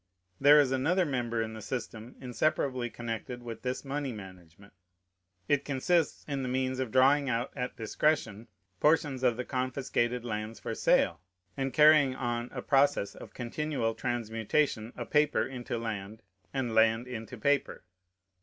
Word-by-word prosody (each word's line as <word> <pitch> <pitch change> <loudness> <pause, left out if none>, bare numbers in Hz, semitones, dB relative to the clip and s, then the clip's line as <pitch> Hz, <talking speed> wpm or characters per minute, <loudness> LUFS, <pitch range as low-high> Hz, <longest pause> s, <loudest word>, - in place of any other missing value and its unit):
There 145 +2 +8
is 140 -3 +3
another 165 +8 +2
member 120 -5 -1
in 110 0 -6
the 110 - -8
system 115 0 -6
inseparably 130 -1 -1
connected 120 +1 -6
with 115 -1 -7
this 130 +2 -3
money 140 0 -2
management. 95 -2 -12 0.7
It 145 -2 +2
consists 145 +4 0
in 140 -2 -2
the 130 - -3
means 130 0 -1
of 130 -3 -1
drawing 135 +3 +4
out 120 +1 -1
at 125 -2 -4
discretion 115 -2 0 0.3
portions 150 -4 +2
of 125 -3 +2
the 125 - -3
confiscated 125 -2 -1
lands 110 -1 -4
for - - -4
sale, 85 -2 +2 0.3
and 135 0 -2
carrying 150 -1 +6
on 120 -1 -2
a - - -6
process 140 -6 +2
of - - -12
continual 125 -1 -2
transmutation 115 +1 -1
of 120 - -6
paper 150 0 +3
into 125 -2 -5
land 110 -1 -5 0.3
and 130 -4 -2
land 115 +2 +3
into 125 0 -7
paper. 140 +4 0
125 Hz, 150 wpm, -30 LUFS, 115-135 Hz, 0.7 s, There